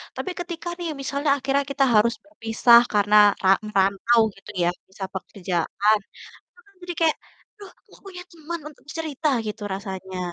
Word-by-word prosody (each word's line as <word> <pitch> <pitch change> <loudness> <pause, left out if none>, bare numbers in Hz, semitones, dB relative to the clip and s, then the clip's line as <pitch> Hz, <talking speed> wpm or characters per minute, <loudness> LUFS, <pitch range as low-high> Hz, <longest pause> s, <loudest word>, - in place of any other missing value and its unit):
Tapi - - -4
ketika 345 -1 -6
nih 345 - -3
misalnya 280 +2 -2
akhirnya 275 +1 0
kita 275 0 +1
harus 225 +2 +4
berpisah 235 -5 +4
karena 205 0 +3 0.3
ra 190 - +4 0.2
merantau 200 +3 +2 0.2
gitu 195 +1 -12
ya, - - +2 0.2
bisa 190 +1 -9
pekerjaan, 190 +2 0 0.4
itu - - -32
kan 400 - -25
jadi 355 0 -5
kayak, 320 -2 +3 0.4
"Aduh 410 -2 -12 0.3
gak - - -19
punya 360 -2 -8
teman 335 0 -7
untuk 300 - -19
cerita," 315 -1 -2 0.2
gitu 210 0 -5
rasanya. 190 -1 -7
240 Hz, 155 wpm, -23 LUFS, 200-320 Hz, 0.4 s, harus